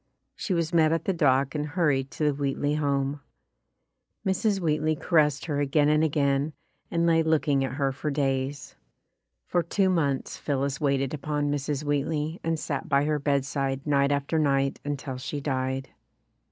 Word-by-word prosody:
She 195 -6 -2
was 165 0 -1
met 160 -2 +4
at 165 -1 0
the 195 - +1
dock 135 -4 +2
and 150 - -1
hurried 145 -4 0
to 155 - -4
the 150 -1 +3
Wheatley 140 +1 -1
home. 140 -1 0 1.0
Mrs. 195 +1 +1
Wheatley 155 -2 +1
caressed 150 -3 +2
her 145 -4 -1
again 145 +1 +2
and 150 +1 +3
again, 140 -1 +1 0.4
and 170 0 +1
lay 165 -1 +4
looking 155 -3 +2
at 130 - -3
her 135 -1 0
for 145 +3 -4
days. 135 -1 -2 0.7
For 175 - +1
two 190 +3 +1
months 140 -6 0
Phillis 140 0 -2
waited 140 -1 +1
upon 145 0 -1
Mrs. 145 0 -2
Wheat 145 -1 0
ley 155 +2 -2
and 165 0 0
sat 140 -3 -4
by 140 0 +3
her 150 0 0
bedside 140 -1 -1
night 140 -1 +2
after 140 +3 0
night 135 -2 +1
until 140 -2 -4
she 145 +3 -4
died. 130 -1 -2
145 Hz, 165 wpm, -27 LUFS, 140-155 Hz, 1.0 s, met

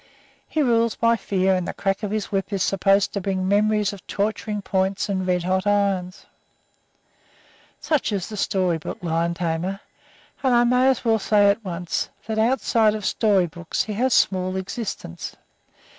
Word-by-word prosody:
He 310 - 0
rules 230 -3 +2
by 230 0 +3
fear, 190 -3 +1
and 180 -2 -1
the - - -5
crack 195 -1 -1
of 210 - -3
his 215 0 -3
whip 195 +1 -2
is 195 -2 0
supposed 195 +1 +2
to 200 - -2
bring 185 -1 -1
memories 210 0 +2
of 200 - -12
torturing 210 0 -2
points 190 +1 -1
and 190 -2 -1
red 180 -1 +1
hot 185 +2 0
irons. 195 -3 0 1.5
Such 305 -7 0
is 195 -3 -2
the 220 - -7
story 185 -4 0
book - - -6
lion 170 0 0
tamer, 175 +3 -2 0.6
and 260 -3 +3
I 240 - +5
may 250 +2 +3
as 265 -2 +1
well 225 -1 +3
say 205 -1 +4
at 220 +3 -4
once 175 -2 -3 0.2
that 220 0 -2
outside 225 -2 +2
of 210 -2 -5
story 200 -4 +2
books 170 0 -3
he 215 - -5
has 255 +5 +1
small 185 -1 +2
existence. 190 - -5
200 Hz, 175 wpm, -23 LUFS, 185-220 Hz, 1.5 s, I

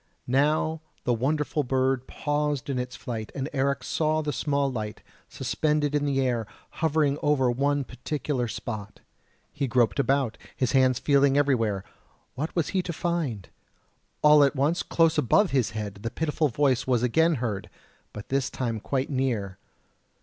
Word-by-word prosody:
Now 150 +4 +1 0.2
the 125 - +1
wonderful 150 +5 0
bird 130 0 0
paused 145 -2 -1
in 130 - -1
its 125 0 -4
flight, 110 -3 -5
and 135 0 -2
Eric 140 0 0
saw 155 0 0
the 150 -1 -2
small 140 0 0
light, 110 -3 -5 0.3
suspended 150 -1 0
in 145 -1 +1
the 140 -1 +1
air, 120 -4 0 0.3
hovering 150 -2 +2
over 135 -4 +2
one 140 +3 +1
particular 130 0 -3
spot: 110 -3 -6 0.5
he 140 - -1
groped 120 -5 +2
about, 135 -2 +1 0.2
his 130 -3 0
hands 130 -2 +4
feeling 140 0 +3
everywhere 115 -9 +1 0.5
what 150 +5 -4
was 170 -4 0
he 190 - +1
to 180 - -4
find? 155 - -2 0.7
All 150 -1 +7
at 140 +1 +2
once, 145 +5 +1
close 165 -1 +2
above 175 - +3
his 130 -5 +2
head 100 -2 -5
the 115 - -2
pitiful 155 +4 0
voice 130 -1 +1
was 125 -2 +2
again 160 +7 +3
heard, 110 -6 -3 0.4
but 105 - -9
this 135 -1 0
time 115 -4 -3
quite 135 +5 -2
near. 115 -8 -1
135 Hz, 155 wpm, -26 LUFS, 120-150 Hz, 0.7 s, All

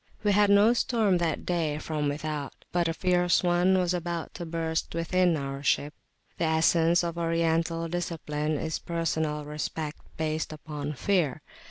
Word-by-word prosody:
We 205 - +3
had 205 0 +4
no 205 +3 +6
storm 220 -6 +2
that 165 -3 -1
day 165 -4 0
from 150 -1 -2
without, 150 -1 -4 0.2
but 175 -1 +1
a 165 - 0
fierce 180 -1 +2
one 180 +2 +3
was 180 -1 +1
about 170 -1 -3
to 175 -2 -6
burst 160 0 -2
within 175 0 +2
our 135 -1 -4
ship. 145 +1 +1 0.5
The 170 - +2
essence 165 +2 +3
of 170 0 -3
Oriental 165 0 0
discipline 155 -3 -2
is 160 +2 -3
personal 160 -3 -2
respect 150 +1 -4 0.2
based 155 0 -2
upon 150 -1 -5
fear. 155 -2 0
165 Hz, 155 wpm, -28 LUFS, 155-175 Hz, 0.5 s, no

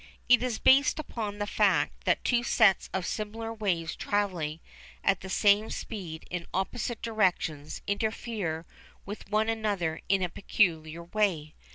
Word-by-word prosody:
It 250 0 +6
is 245 -3 -1
based 275 +3 +5
upon 220 -9 -4
the 205 - -2
fact - - +1
that - - +2
two 245 -1 +2
sets 220 -5 +3
of 190 -2 -2
similar 225 +1 -4
waves 180 -7 -1
travelling 180 -7 -1 0.4
at 195 -1 +2
the 190 - -7
same 205 +3 +4
speed 175 -8 -6
in 175 -1 -4
opposite 230 +4 -2
directions 180 -9 -1
interfere 200 -5 -2 0.4
with 200 0 -8
one 215 +1 +2
another 205 -8 -1
in 195 -1 +3
a 180 - 0
peculiar 165 -3 0
way. 170 -5 0
200 Hz, 145 wpm, -29 LUFS, 170-220 Hz, 0.4 s, It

